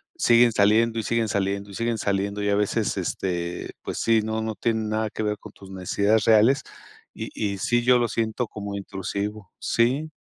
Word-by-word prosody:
siguen 120 0 +5
saliendo, 115 +3 +3
y - - -2
siguen 115 0 0
saliendo, 100 0 -1
y - - -9
siguen 115 +1 -1
saliendo, 100 +1 -1
y 100 - +1
a 100 - +3
veces, 105 0 0
este, 90 -2 -3
pues - - -5
sí, 115 -1 +3
no 110 0 -2
no 110 0 -2
tiene 110 0 0
nada 110 0 -1
que 110 - -4
ver 105 0 -1
con - - -12
tus 95 -1 -14
necesidades 100 +3 +1
reales, 115 +5 +5 0.5
y - - -6
y 100 -2 -2
sí, 120 +5 +1
yo 125 +1 +5
lo 120 - +1
siento 115 +2 -1
como 100 -1 -6
intrusivo. 100 +1 -5
Sí. 130 +7 +1
110 Hz, 195 wpm, -24 LUFS, 100-115 Hz, 0.5 s, siguen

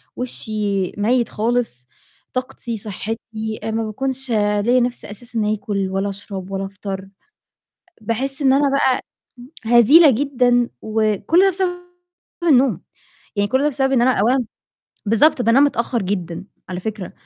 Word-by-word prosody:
وشي 210 -6 -2
ميِّت 235 +4 +1
خالص، 220 - -1 0.5
طاقتي، 245 -2 -4
صحتي، 220 +2 -5
آآ 225 - -2
ما 225 0 -1
باكونش 265 +3 -3
ليّا 210 +3 +2
نِفس 245 0 -2
أساسًا 215 0 -3
آكل 200 -2 -2
ولا 195 +1 -1
أشرب 195 -1 -7
ولا 195 0 -2
أفطر، 195 -1 -7 0.9
باحِسّ 265 +6 -3
إن 265 -1 +4
أنا 280 0 +3
بقى 265 -2 +2 0.6
هزيلة 265 +7 +7
جدًا، 245 -2 +2
وكُلّ 220 - +1
ده 390 - +5
بسبب 370 0 0 0.7
النوم، 255 - +3 0.6
يعني 205 0 +1
كُلّ 260 +3 +1
ده 295 - +3
بسبب 270 0 0
إن 240 -2 +3
أنا 260 +1 +4
أولًا 245 +2 +2 0.6
بالضبط 245 +5 +3
بانام 240 +5 +5
متأخر 235 -4 0
جدًا، 180 -2 -3 0.2
على 185 0 -5
فكرة، 210 -2 -5
225 Hz, 135 wpm, -20 LUFS, 205-260 Hz, 0.9 s, هزيلة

